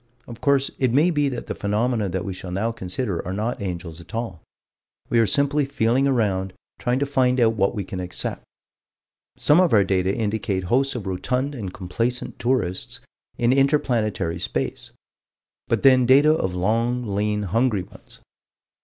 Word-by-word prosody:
Of 120 Hz, -1 st, -11 dB
course 140 Hz, -1 st, +2 dB
it 130 Hz, -3 st, +2 dB
may 150 Hz, +8 st, +4 dB
be 145 Hz, -3 st, +1 dB
that 125 Hz, -3 st, -5 dB
the -, -, -4 dB
phenomena 105 Hz, +1 st, 0 dB
that 90 Hz, 0 st, -3 dB
we 95 Hz, -, -3 dB
shall 90 Hz, 0 st, -8 dB
now 100 Hz, +6 st, -1 dB
consider 95 Hz, -2 st, -3 dB
are 90 Hz, -, -5 dB
not 110 Hz, +3 st, -2 dB
angels 85 Hz, -3 st, -5 dB
at 100 Hz, -, -11 dB
all. 110 Hz, -8 st, -4 dB, 0.7 s
We 120 Hz, -, +4 dB
are 115 Hz, -, +4 dB
simply 145 Hz, +6 st, +2 dB
feeling 135 Hz, 0 st, +1 dB
around, 100 Hz, -7 st, 0 dB, 0.3 s
trying 125 Hz, 0 st, 0 dB
to 140 Hz, -, +1 dB
find 130 Hz, -2 st, +2 dB
out 115 Hz, -2 st, +4 dB
what 100 Hz, +1 st, +1 dB
we 100 Hz, -, -2 dB
can 95 Hz, 0 st, -6 dB
accept. 90 Hz, 0 st, -4 dB, 1.0 s
Some 155 Hz, +5 st, +4 dB
of 180 Hz, -7 st, +2 dB
our 105 Hz, -2 st, +6 dB
data 95 Hz, -1 st, +1 dB
indicate 105 Hz, -3 st, -1 dB
hosts 130 Hz, +9 st, +1 dB
of 115 Hz, -5 st, -5 dB
rotund 125 Hz, +9 st, -2 dB
and 105 Hz, -9 st, -5 dB
complacent 115 Hz, +7 st, -3 dB
tourists 120 Hz, -8 st, -1 dB, 0.4 s
in 120 Hz, +1 st, +3 dB
inter 135 Hz, +2 st, +4 dB
planetary 110 Hz, -, -1 dB
space -, -, -3 dB, 0.8 s
but 115 Hz, -, 0 dB
then 130 Hz, -2 st, +6 dB
data 145 Hz, +4 st, +6 dB
of 95 Hz, -, -1 dB
long, 115 Hz, +6 st, 0 dB
lean, 105 Hz, +1 st, 0 dB
hungry 105 Hz, 0 st, +1 dB
ones. -, -, -16 dB
115 Hz, 170 wpm, -23 LUFS, 95-130 Hz, 1.0 s, our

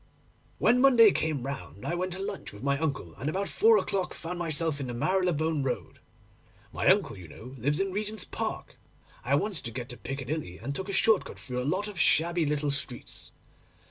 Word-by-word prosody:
'When 250 Hz, +1 st, +4 dB
Monday 240 Hz, -6 st, +8 dB
came 155 Hz, -8 st, -1 dB
round 135 Hz, -6 st, -6 dB
I -, -, -1 dB
went 180 Hz, +1 st, -1 dB
to 185 Hz, -, -6 dB
lunch 195 Hz, -, -5 dB
with 105 Hz, -, -11 dB
my 140 Hz, 0 st, +1 dB
uncle, 140 Hz, -, -2 dB
and 140 Hz, +6 st, -1 dB
about 195 Hz, +5 st, -1 dB
four 225 Hz, 0 st, +5 dB
o'clock 190 Hz, -2 st, -1 dB
found 175 Hz, +2 st, -5 dB
myself 160 Hz, -2 st, -1 dB
in 135 Hz, -, -3 dB
the 120 Hz, -, -4 dB
Marylebone 160 Hz, -1 st, +1 dB
Road. 135 Hz, -2 st, -3 dB, 0.7 s
My -, -, -1 dB
uncle, -, -, +4 dB
you 90 Hz, -3 st, -10 dB
know, 115 Hz, -, -11 dB
lives 145 Hz, +6 st, +1 dB
in 195 Hz, 0 st, 0 dB
Regent's 210 Hz, +2 st, -3 dB
Park. -, -, -5 dB, 0.4 s
I -, -, +2 dB
wanted 205 Hz, -6 st, -1 dB
to -, -, -2 dB
get 120 Hz, +2 st, -6 dB
to 120 Hz, -, -8 dB
Piccadilly, 135 Hz, -, -4 dB
and 140 Hz, -, -4 dB
took 190 Hz, +7 st, -4 dB
a -, -, -1 dB
short 210 Hz, +1 st, +4 dB
cut -, -, -10 dB
through 125 Hz, -1 st, -4 dB
a 130 Hz, -, -1 dB
lot 200 Hz, +3 st, -1 dB
of 205 Hz, -4 st, -7 dB
shabby 165 Hz, +1 st, +3 dB
little 145 Hz, 0 st, 0 dB
streets. 135 Hz, -3 st, -4 dB
155 Hz, 205 wpm, -29 LUFS, 135-190 Hz, 0.7 s, Monday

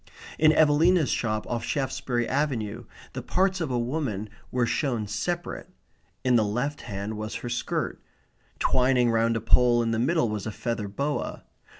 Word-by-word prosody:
In 155 Hz, 0 st, +6 dB
Evelina's 155 Hz, +1 st, +4 dB
shop 110 Hz, -2 st, -1 dB
off 120 Hz, -1 st, -3 dB
Shaftesbury 125 Hz, -2 st, -1 dB
Avenue 130 Hz, -7 st, -1 dB, 0.3 s
the -, -, -4 dB
parts 190 Hz, 0 st, +1 dB
of 160 Hz, -, -1 dB
a 125 Hz, -, 0 dB
woman 120 Hz, -5 st, -2 dB, 0.2 s
were 125 Hz, -1 st, +1 dB
shown 120 Hz, -4 st, -1 dB
separate. 170 Hz, -, -3 dB, 0.5 s
In 125 Hz, -2 st, +4 dB
the 110 Hz, -, +4 dB
left 125 Hz, +8 st, -2 dB
hand 100 Hz, +2 st, -5 dB
was 110 Hz, +1 st, -5 dB
her 120 Hz, -, -5 dB
skirt. 120 Hz, 0 st, -2 dB, 0.6 s
Twining 125 Hz, -2 st, +3 dB
round 115 Hz, 0 st, +2 dB
a -, -, -4 dB
pole 120 Hz, +1 st, +4 dB
in 115 Hz, -, 0 dB
the 110 Hz, -, 0 dB
middle 155 Hz, +2 st, +2 dB
was 105 Hz, -2 st, -3 dB
a -, -, -2 dB
feather 110 Hz, -1 st, -3 dB
boa. 140 Hz, +9 st, -3 dB
120 Hz, 165 wpm, -26 LUFS, 110-145 Hz, 0.6 s, In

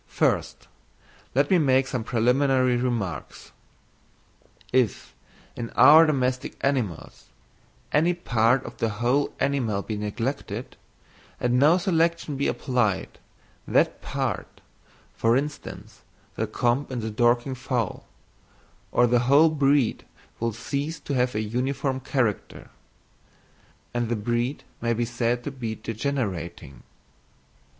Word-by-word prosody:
First -, -, -1 dB, 0.7 s
let 140 Hz, +4 st, +2 dB
me 185 Hz, -, +5 dB
make 135 Hz, -3 st, +3 dB
some 130 Hz, -3 st, -3 dB
preliminary 125 Hz, +2 st, +2 dB
remarks. 120 Hz, -8 st, -3 dB, 1.2 s
If, 125 Hz, -5 st, +1 dB, 0.4 s
in 115 Hz, -1 st, -5 dB
our 155 Hz, +5 st, +8 dB
domestic 130 Hz, -3 st, -1 dB
animals, 125 Hz, -, -2 dB, 0.7 s
any 165 Hz, +4 st, +3 dB
part 125 Hz, -5 st, +2 dB
or 120 Hz, -, -6 dB
the 115 Hz, -, -1 dB
whole 125 Hz, +5 st, +1 dB
animal 115 Hz, -8 st, 0 dB
be 110 Hz, -, -4 dB
neglected, 115 Hz, +6 st, -4 dB, 0.6 s
and 125 Hz, 0 st, +1 dB
no 155 Hz, +6 st, +5 dB
selection 170 Hz, -4 st, 0 dB
be 140 Hz, -, 0 dB
applied, 120 Hz, -8 st, -1 dB, 0.5 s
that -, -, +2 dB
part -, -, -4 dB, 0.5 s
(for 115 Hz, +2 st, +2 dB
instance, 145 Hz, +1 st, -6 dB, 0.3 s
the -, -, -2 dB
comb 125 Hz, +4 st, 0 dB
in 125 Hz, -3 st, -3 dB
the 110 Hz, 0 st, -4 dB
Dorking 120 Hz, +4 st, +2 dB
fowl) 125 Hz, -4 st, -3 dB, 0.8 s
or 125 Hz, -, +4 dB
the 120 Hz, 0 st, +3 dB
whole 150 Hz, +4 st, +7 dB
breed 140 Hz, -4 st, +2 dB, 0.4 s
will 115 Hz, 0 st, 0 dB
cease 140 Hz, +8 st, -4 dB
to 140 Hz, -, -4 dB
have 125 Hz, -3 st, +1 dB
a 110 Hz, -, 0 dB
uniform 130 Hz, +5 st, -2 dB
character: 130 Hz, -5 st, -2 dB, 1.2 s
and 120 Hz, -1 st, -1 dB
the 120 Hz, -, +1 dB
breed 120 Hz, +5 st, -2 dB, 0.2 s
may 115 Hz, 0 st, +1 dB
be 120 Hz, +1 st, -1 dB
said 120 Hz, 0 st, -1 dB
to 145 Hz, -, -4 dB
be 115 Hz, -5 st, -5 dB
degenerating. 100 Hz, -, -4 dB
125 Hz, 120 wpm, -25 LUFS, 115-140 Hz, 1.2 s, our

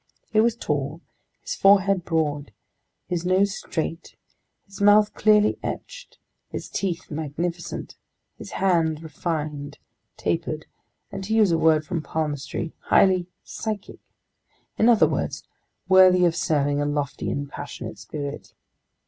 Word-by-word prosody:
He 215 Hz, -, +3 dB
was 230 Hz, +1 st, +3 dB
tall, 150 Hz, -, -2 dB, 0.4 s
his -, -, -4 dB
forehead 195 Hz, -1 st, +4 dB
broad, 150 Hz, -5 st, -1 dB, 0.6 s
his 175 Hz, -2 st, -2 dB
nose 190 Hz, +2 st, +2 dB
straight, 165 Hz, 0 st, -4 dB, 0.5 s
his 195 Hz, 0 st, -11 dB
mouth 205 Hz, +1 st, +5 dB
clearly 210 Hz, 0 st, +3 dB
etched, -, -, -7 dB, 0.3 s
his -, -, -6 dB
teeth 180 Hz, -4 st, -3 dB
magnificent, 160 Hz, +3 st, -4 dB, 0.4 s
his -, -, -10 dB
hands 165 Hz, -4 st, +1 dB
refined, 150 Hz, -3 st, -4 dB, 0.4 s
tapered, 160 Hz, -2 st, -2 dB, 0.5 s
and 195 Hz, 0 st, -5 dB
to 220 Hz, +3 st, 0 dB
use 215 Hz, -5 st, +4 dB
a 165 Hz, -, +3 dB
word 155 Hz, -1 st, +3 dB
from 170 Hz, -2 st, -2 dB
palmistry, 155 Hz, +1 st, -3 dB
highly 185 Hz, -2 st, +4 dB, 0.2 s
"psychic," 215 Hz, -3 st, -5 dB, 0.8 s
in 225 Hz, -, +4 dB
other 230 Hz, -2 st, +6 dB
words, -, -, -3 dB, 0.4 s
worthy 185 Hz, -1 st, +6 dB
of 165 Hz, -1 st, +2 dB
serving 145 Hz, -3 st, +1 dB
a -, -, 0 dB
lofty 145 Hz, -2 st, -2 dB
and 140 Hz, 0 st, -3 dB
passionate -, -, -7 dB
spirit. 145 Hz, -1 st, -7 dB
170 Hz, 125 wpm, -24 LUFS, 150-195 Hz, 0.8 s, other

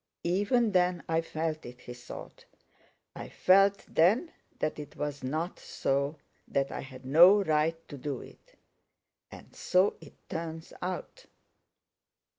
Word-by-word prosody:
Even 205 Hz, +6 st, +2 dB
then 180 Hz, -2 st, +2 dB
I 165 Hz, 0 st, +1 dB
felt 160 Hz, -1 st, -3 dB
it," 125 Hz, +1 st, -11 dB
he 125 Hz, -, -8 dB
thought. 120 Hz, 0 st, -11 dB, 0.7 s
"I -, -, -7 dB
felt 195 Hz, +2 st, +4 dB
then 215 Hz, -, +3 dB, 0.3 s
that 155 Hz, -, -2 dB
it 145 Hz, -1 st, -9 dB
was 145 Hz, -2 st, -4 dB
not 155 Hz, +7 st, -3 dB
so, 140 Hz, +3 st, -1 dB, 0.3 s
that 135 Hz, 0 st, 0 dB
I -, -, -4 dB
had 130 Hz, -1 st, -11 dB
no 175 Hz, +9 st, +7 dB
right 155 Hz, -1 st, +1 dB
to 145 Hz, -, -9 dB
do 135 Hz, -1 st, -3 dB
it. -, -, -15 dB, 0.7 s
And -, -, -13 dB
so 185 Hz, +3 st, +2 dB
it 155 Hz, -, -14 dB
turns 165 Hz, 0 st, -6 dB
out." 185 Hz, -, -5 dB
160 Hz, 135 wpm, -30 LUFS, 145-185 Hz, 0.7 s, no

